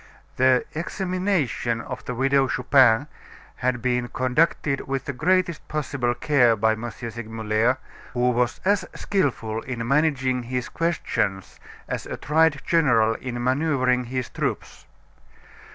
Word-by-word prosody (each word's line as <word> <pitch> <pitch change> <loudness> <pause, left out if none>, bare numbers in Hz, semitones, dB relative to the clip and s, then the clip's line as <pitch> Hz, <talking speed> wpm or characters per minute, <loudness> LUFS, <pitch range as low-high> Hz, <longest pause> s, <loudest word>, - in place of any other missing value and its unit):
The 130 0 +4
examination 180 - -1
of 125 +2 -7
the 125 - -4
Widow 135 +2 +2
Chupin 130 -1 +4 0.5
had 120 -2 -1
been 125 -1 0
conducted 135 +2 0
with 135 -1 -2
the 140 - -3
greatest 180 +4 0
possible 140 -5 -1
care 125 -4 +3
by 110 +1 +2
M. 110 +2 -3
Segmuller, 115 +1 -1 0.4
who 125 0 +2
was 120 0 0
as 200 +1 +3
skilful 115 - -1
in 120 -2 -5
managing 135 -3 +1
his 125 +1 -4
questions 115 - -2 0.3
as - - -4
a - - -5
tried 155 -1 +2
general 120 -10 +3
in 120 0 -5
maneuvering 130 -2 +1
his 125 0 -3
troops. 75 -1 -4
125 Hz, 125 wpm, -24 LUFS, 120-145 Hz, 0.5 s, The